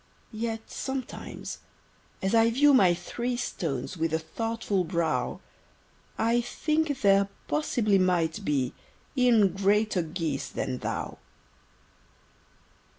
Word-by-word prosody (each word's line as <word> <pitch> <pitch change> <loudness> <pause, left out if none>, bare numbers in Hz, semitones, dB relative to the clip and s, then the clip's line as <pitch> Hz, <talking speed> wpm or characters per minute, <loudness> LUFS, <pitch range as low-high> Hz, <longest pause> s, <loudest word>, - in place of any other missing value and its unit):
Yet 225 0 -4
sometimes, 265 -1 -5 0.6
as 190 - +1
I 225 0 +5
view 285 +5 +5
my 185 -9 +6
three 240 +7 -3
Stones 155 - -3
with 160 0 0
a - - +3
thoughtful 210 +3 -2
brow, 160 -7 -1 0.8
I 230 +2 +2
think 305 +2 -1
there 200 0 +5 0.2
possibly 230 -10 +2
might 180 +1 +1
be 135 -7 0 0.4
E'en 240 -6 +5
greater 200 0 +2
geese 160 -4 -3
than 130 -1 -3
thou. - - -4
200 Hz, 105 wpm, -28 LUFS, 165-235 Hz, 0.8 s, my